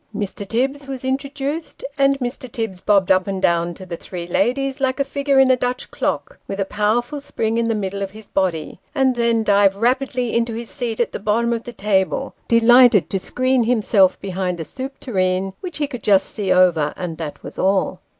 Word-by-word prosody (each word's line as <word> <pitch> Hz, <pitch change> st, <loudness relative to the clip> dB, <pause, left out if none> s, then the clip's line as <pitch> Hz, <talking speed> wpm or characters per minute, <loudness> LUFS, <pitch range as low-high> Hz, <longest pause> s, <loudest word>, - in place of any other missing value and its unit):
Mr. 205 Hz, -1 st, -4 dB
Tibbs 270 Hz, +5 st, -1 dB
was 265 Hz, -1 st, -6 dB
introduced, 280 Hz, +4 st, -3 dB
and 275 Hz, -1 st, +3 dB
Mr. 250 Hz, -1 st, -5 dB
Tibbs 225 Hz, -6 st, -4 dB
bobbed 200 Hz, -3 st, +3 dB
up 185 Hz, 0 st, +3 dB
and 195 Hz, -1 st, -2 dB
down 170 Hz, -1 st, +1 dB
to 185 Hz, -, -10 dB
the 175 Hz, -2 st, -5 dB
three 175 Hz, 0 st, -7 dB
ladies 265 Hz, +9 st, 0 dB
like 265 Hz, 0 st, 0 dB
a -, -, +3 dB
figure 280 Hz, 0 st, 0 dB
in 265 Hz, -1 st, +6 dB
a -, -, +5 dB
Dutch 250 Hz, 0 st, -3 dB
clock, -, -, -3 dB
with 195 Hz, -, -5 dB
a 195 Hz, -, +1 dB
powerful 225 Hz, +8 st, 0 dB
spring 230 Hz, -5 st, -2 dB
in 230 Hz, -, +1 dB
the 225 Hz, -, +1 dB
middle 200 Hz, -1 st, -3 dB
of 195 Hz, -, -2 dB
his 215 Hz, +1 st, -13 dB
body, 180 Hz, -4 st, -2 dB, 0.2 s
and 265 Hz, -2 st, +2 dB
then 235 Hz, -1 st, +2 dB
dived 200 Hz, -2 st, +4 dB
rapidly 250 Hz, +2 st, 0 dB
into 230 Hz, -1 st, 0 dB
his 230 Hz, 0 st, -6 dB
seat 240 Hz, -5 st, -3 dB
at 240 Hz, -, +1 dB
the -, -, -5 dB
bottom 230 Hz, +3 st, +1 dB
of 230 Hz, 0 st, -4 dB
the 240 Hz, -, -6 dB
table, 205 Hz, +5 st, 0 dB
delighted 230 Hz, -5 st, +6 dB
to 195 Hz, -, 0 dB
screen 255 Hz, +4 st, +1 dB
himself 210 Hz, -5 st, +3 dB
behind 185 Hz, -2 st, -3 dB
a 160 Hz, -, -4 dB
soup 265 Hz, -, -7 dB
tureen, 190 Hz, -4 st, -1 dB
which 355 Hz, -5 st, -6 dB
he 300 Hz, -, 0 dB
could 250 Hz, -5 st, -7 dB
just 195 Hz, -2 st, +4 dB
see 200 Hz, -4 st, -2 dB
over, 175 Hz, -5 st, +3 dB
and 170 Hz, -3 st, -5 dB
that 155 Hz, -3 st, -6 dB
was -, -, -9 dB
all. 195 Hz, 0 st, +1 dB
225 Hz, 210 wpm, -20 LUFS, 190-260 Hz, 0.2 s, in